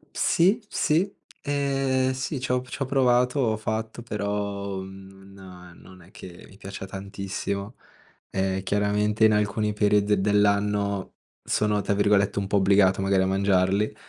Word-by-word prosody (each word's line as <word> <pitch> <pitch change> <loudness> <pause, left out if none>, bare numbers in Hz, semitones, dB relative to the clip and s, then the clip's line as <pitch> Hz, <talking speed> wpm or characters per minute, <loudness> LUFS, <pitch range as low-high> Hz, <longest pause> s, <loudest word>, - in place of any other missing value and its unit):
Sì, 195 +7 +2
sì, 175 +6 +1 0.3
ehm, 135 -2 0
sì, 130 +2 -4
c'ho 125 -1 -1
p 125 - -15
c'ho 135 - -3
provato, 125 0 +2
ho 110 -4 +1
fatto, 110 +2 -4
però 100 -2 -3
non 95 -2 -13
non 95 -1 -16
è 90 - -19
che 90 -6 -12
mi - - -17
piaccia 100 -1 -8
tantissimo. 100 +2 -5 0.5
Eh, 95 0 -1
chiaramente 105 +2 +1
in 110 - +6
alcuni 105 0 0
periodi 105 -1 +2
dell'anno 100 -1 +1 0.3
sono 105 -1 +1
tra 100 - -1
virgolette 100 0 +2
un 100 - -4
po' 100 - +1
"obbligato" 95 -1 +4
magari 95 -1 +2
a - - +1
mangiarli, 95 +2 +1
100 Hz, 140 wpm, -25 LUFS, 95-110 Hz, 0.5 s, in